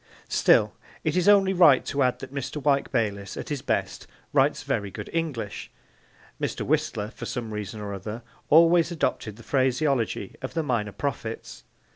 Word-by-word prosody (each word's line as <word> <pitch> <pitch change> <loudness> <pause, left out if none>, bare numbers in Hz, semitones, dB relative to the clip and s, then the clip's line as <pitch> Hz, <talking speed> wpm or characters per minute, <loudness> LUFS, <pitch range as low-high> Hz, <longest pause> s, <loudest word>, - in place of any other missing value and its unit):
Still, - - +4 0.3
it 155 +1 0
is 180 +2 +3
only 195 -2 +5
right 165 -8 +6
to 140 - -1
add 125 -1 +2
that - - -8
Mr. 140 +1 -4
Wyke 140 -1 +1
Bayliss, 105 -5 -2
at - - -6
his 145 -3 -3
best, - - -2 0.3
writes - - +3
very 100 -1 -1
good 105 +2 -8
English. 140 -11 -3 0.7
Mr. - - -2
Whistler, 145 -8 -1
for - - -8
some 115 -4 -4
reason 105 +1 -5
or 100 -1 -5
other, 105 +4 -6 0.3
always 165 +2 +6
adopted 115 -9 -2
the 115 - -14
phraseology 130 -5 0
of 130 +4 -6
the 165 - 0
minor 115 -7 -1
prophets. 115 -3 -5
130 Hz, 165 wpm, -26 LUFS, 110-155 Hz, 0.7 s, right